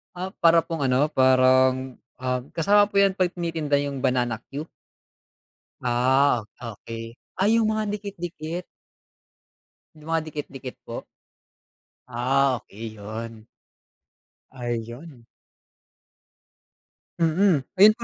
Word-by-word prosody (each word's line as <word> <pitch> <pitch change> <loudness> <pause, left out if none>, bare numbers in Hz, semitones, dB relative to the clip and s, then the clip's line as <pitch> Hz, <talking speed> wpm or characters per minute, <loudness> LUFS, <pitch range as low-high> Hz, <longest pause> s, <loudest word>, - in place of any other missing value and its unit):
Ah, 180 +1 -3 0.2
para 165 0 +7
pong 165 -2 -3
ano 135 +4 +3
parang, 130 -1 +4 0.2
ah, 125 -1 -1
kasama 205 +5 +4
po 200 - +3
yan 195 -1 +4
'pag 185 -2 +1
tinitinda 165 -5 -1
yung 140 -2 -3
banana 120 -3 0
cue? 150 +4 -5 1.1
Ah, 125 0 +3 0.2
okey, 115 0 -8 0.2
ay 215 +4 +4
yung 220 -1 +2
mga 215 -1 -1
dikit-dikit. 175 -4 -6 1.3
Yung 155 0 -15
mga 165 -1 +1
dikit-dikit 135 -3 -7
po? 115 - -5 1.0
Ah, 130 +3 +2
okay 110 +1 -9
yun. 110 +1 -7 1.1
Ayun. 120 +2 -6 1.9
Hmm, 165 +1 +3 0.2
ayun 210 +3 +8
po 235 - -7
140 Hz, 105 wpm, -25 LUFS, 125-170 Hz, 1.9 s, ayun